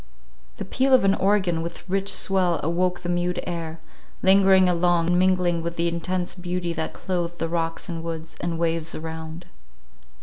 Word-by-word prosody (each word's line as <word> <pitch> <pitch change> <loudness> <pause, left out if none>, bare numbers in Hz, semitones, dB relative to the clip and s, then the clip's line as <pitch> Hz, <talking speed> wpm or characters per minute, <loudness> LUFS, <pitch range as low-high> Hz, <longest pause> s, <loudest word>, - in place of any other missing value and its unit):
The - - -5
peal 260 +7 +3
of 255 - +3
an 195 - +5
organ 190 -5 +1
with 170 +1 -7
rich 195 +1 0
swell 180 -4 +1
awoke 180 +3 0
the 175 - -5
mute 175 0 0
air, 165 -2 -5 0.4
lingering 190 -1 +6
along, 175 -1 +2
and 175 - +3
mingling 180 -2 +2
with 170 +1 -4
the 170 0 +1
intense 175 +2 -2
beauty 180 -1 -3
that 160 -1 -3
clothed 175 -2 -3
the 165 - -2
rocks 165 0 -2
and 165 -2 -5
woods, 165 -1 -6
and 170 -1 -2
waves 165 -1 -1
around. 160 +1 -7
175 Hz, 170 wpm, -24 LUFS, 165-185 Hz, 0.4 s, lingering